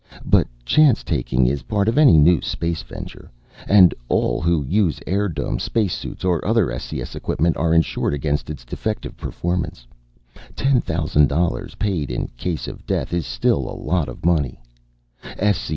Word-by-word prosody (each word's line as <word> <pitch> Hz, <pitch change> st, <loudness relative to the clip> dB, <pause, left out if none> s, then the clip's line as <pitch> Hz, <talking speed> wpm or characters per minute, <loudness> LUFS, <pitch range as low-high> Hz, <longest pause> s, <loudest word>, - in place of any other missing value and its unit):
"But -, -, +4 dB, 0.2 s
chance 150 Hz, -5 st, +4 dB
taking 65 Hz, +1 st, 0 dB
is 70 Hz, +2 st, 0 dB
part 100 Hz, -, -1 dB
of 115 Hz, -, +2 dB
any 145 Hz, -, +7 dB
new 80 Hz, +3 st, +5 dB
space 85 Hz, -1 st, -2 dB
venture. -, -, -10 dB, 0.4 s
And 95 Hz, -4 st, +7 dB, 0.2 s
all -, -, +1 dB
who 85 Hz, -2 st, +1 dB
use 90 Hz, +1 st, +1 dB
airdomes, 100 Hz, -3 st, -1 dB
spacesuits, 105 Hz, -4 st, -2 dB
or 90 Hz, -4 st, +1 dB
other 110 Hz, -, +2 dB
S.C.S. 65 Hz, -, -5 dB
equipment, 85 Hz, +2 st, 0 dB
are 85 Hz, -1 st, 0 dB
insured 70 Hz, -4 st, +1 dB
against 75 Hz, +1 st, -2 dB
its 75 Hz, -5 st, -7 dB
defective 105 Hz, -, -4 dB
performance. 85 Hz, -8 st, -4 dB, 0.7 s
Ten 135 Hz, -2 st, +2 dB
thousand 75 Hz, -3 st, +2 dB
dollars, 85 Hz, +4 st, -1 dB
paid 90 Hz, -9 st, -1 dB
in -, -, -3 dB
case 80 Hz, +6 st, -3 dB
of -, -, -9 dB
death, -, -, -2 dB
is 85 Hz, -5 st, -1 dB
still -, -, +1 dB
a -, -, -7 dB
lot 90 Hz, -5 st, -1 dB
of -, -, -9 dB
money. 80 Hz, -6 st, +1 dB
85 Hz, 150 wpm, -21 LUFS, 75-100 Hz, 0.7 s, any